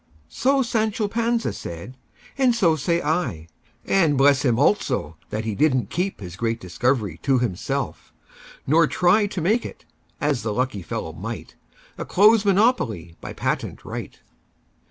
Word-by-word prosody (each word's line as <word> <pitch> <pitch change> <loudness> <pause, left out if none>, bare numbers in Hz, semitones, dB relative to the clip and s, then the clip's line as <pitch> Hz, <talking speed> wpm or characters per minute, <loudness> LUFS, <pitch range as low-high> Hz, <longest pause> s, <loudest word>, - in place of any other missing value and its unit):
So 270 - +2
Sancho 220 -2 0
Panza 230 +2 0
said, 85 +10 -8 0.4
and 260 -3 +3
so 170 -8 +3
say 170 +3 0
I:And 145 - -1
bless 135 -1 +5
him, 120 -5 +2
also, 130 - +1
that 110 +1 -3
he 110 - -2
did 145 +4 +2
n't 125 - -2
keepHis 140 - -3
great 115 0 -1
discovery 100 - -1
to 135 -2 +2
himself; 115 -8 -3 0.5
nor 160 +3 +4
tryTo 185 +1 +2
make 220 +7 +2
it—as 145 -4 -5
the 110 -2 -3
lucky 125 -6 -1
fellow - - -5
might—A - - -9
close 210 +2 +5
monopoly 185 - +1
by - - -7
patent - - -3
right! - - -7
145 Hz, 135 wpm, -23 LUFS, -, 0.5 s, bless